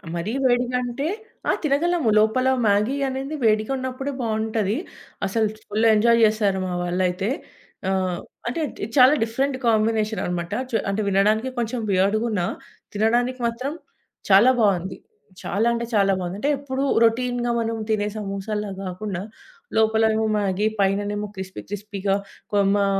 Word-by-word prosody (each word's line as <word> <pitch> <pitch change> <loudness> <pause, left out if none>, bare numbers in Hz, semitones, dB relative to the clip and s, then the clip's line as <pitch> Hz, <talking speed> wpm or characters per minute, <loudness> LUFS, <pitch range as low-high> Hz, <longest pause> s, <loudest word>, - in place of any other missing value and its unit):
మరీ 170 +5 -2
వేడిగా 250 0 +2
అంటే 245 +5 -3 0.4
ఆ! - - +6
తినగలము. 310 -1 +1
లోపల 220 +4 +2 0.2
మ్యాగీ 210 +5 +2
అనేది 270 +3 -4
వేడిగా 215 +1 +2
ఉన్నప్పుడే 260 +2 -4
బాగుంటది. 220 -1 -1 0.5
అసలు 220 +3 +1 0.2
ఫుల్ 215 +2 0
ఎంజాయ్ 230 +2 +4
చేస్తారు 210 -3 +1
మా 180 - -3
వాళ్లయితే. 180 +2 0 0.6
ఆహ్, 185 -2 0 0.3
అంటే 250 +7 -2 0.4
చాలా 255 +2 +8
డిఫరెంట్ 265 +4 -1
కాంబినేషన్ 220 -2 +1
అన్నమాట. 175 +1 -3 0.2
చు 240 - -2
అంటే 200 +2 0
వినడానికి 210 +5 +2
కొంచెం 235 +1 -2
వియర్డ్‌గున్న 205 +2 +1 0.5
తినడానికి 240 +4 +1
మాత్రం 255 +5 -3 0.6
చాలా 205 +6 +7
బాగుంది. 190 -3 +1 0.5
చాలా 220 +4 0
అంటే 235 0 -2
చాలా 195 -1 +4
బాగుంది. 180 +1 -4
అంటే 285 +6 +1
ఎప్పుడూ 270 -1 -3 0.2
రొటీన్‌గా 240 +1 0
మనం 230 0 -1
తినే 210 -1 +1
సమోసాల్లా 210 +1 -3
గాకుండా, 185 0 -4 0.6
లోపలేమో 220 0 +3
మ్యాగీ 200 0 +1
పైన 195 0 +3
నేమో 205 0 -3
క్రిస్పీ 190 0 -7
క్రిస్పీగా 200 -1 -2
న్ - - -9 0.3
కొ 205 - +1 0.2
మా 200 -1 +2
215 Hz, 135 wpm, -23 LUFS, 200-240 Hz, 0.6 s, చాలా